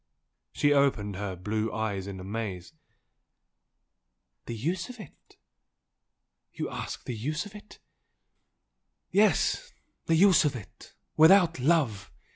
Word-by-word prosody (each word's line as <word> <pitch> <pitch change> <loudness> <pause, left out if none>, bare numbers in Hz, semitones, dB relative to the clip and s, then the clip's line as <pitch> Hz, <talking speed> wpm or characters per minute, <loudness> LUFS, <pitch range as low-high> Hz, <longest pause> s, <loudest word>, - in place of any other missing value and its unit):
She 145 0 +2
opened 130 -8 +1
her 100 -2 -4
deep 90 - -17
blue 110 +2 -1
eyes 100 -4 -3
in 95 -1 -7
amaze. 95 - -5 1.7
"The 115 - -4
use 170 - -3
of 250 -1 -10
it?... 175 - -15 1.1
You - - -5
ask - - -6
the 125 - -4
use 150 - -3
of 205 - -11
it? 210 0 -13 0.7
" - - -53
"Yes 215 - +2 0.4
the 165 - +3
use 185 +2 +6
of 145 -3 0
it 110 -6 -12 0.2
without 170 0 +6
love!" 135 - +1
130 Hz, 125 wpm, -28 LUFS, 105-170 Hz, 1.7 s, use